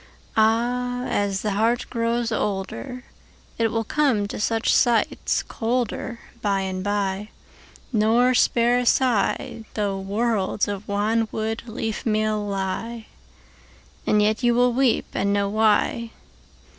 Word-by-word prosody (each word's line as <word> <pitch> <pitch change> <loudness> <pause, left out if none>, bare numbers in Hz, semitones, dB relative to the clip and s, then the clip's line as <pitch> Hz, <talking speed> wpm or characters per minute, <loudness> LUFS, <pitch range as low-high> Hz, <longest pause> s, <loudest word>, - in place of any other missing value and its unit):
Áh! 245 +3 +1
ás 200 -2 0
the 210 - 0
heart 225 +4 +1
grows 235 0 0
olderIt 200 - -3 0.7
will 225 +1 -1
come 240 -5 +1
to - - -6
such 225 +1 +1
sights 235 -2 +2
colderBy 235 0 -2 0.5
and 185 -1 -3
by, 205 0 -1 0.6
nor 230 +4 +4
spare 240 0 +3
a - - +1
sighThough 215 -4 0
worlds 205 -1 0
of 205 0 -5
wanwood 220 +2 0
leafmeal 215 -2 -1
lie; 200 +4 -3 1.0
And 210 0 +4
yet 215 +3 +1
you 240 -1 +3
wíll 245 0 +3
weep 255 -1 +2
and 200 +1 0
know 200 0 +1
why. 220 +2 +2
220 Hz, 110 wpm, -23 LUFS, 205-235 Hz, 1.0 s, nor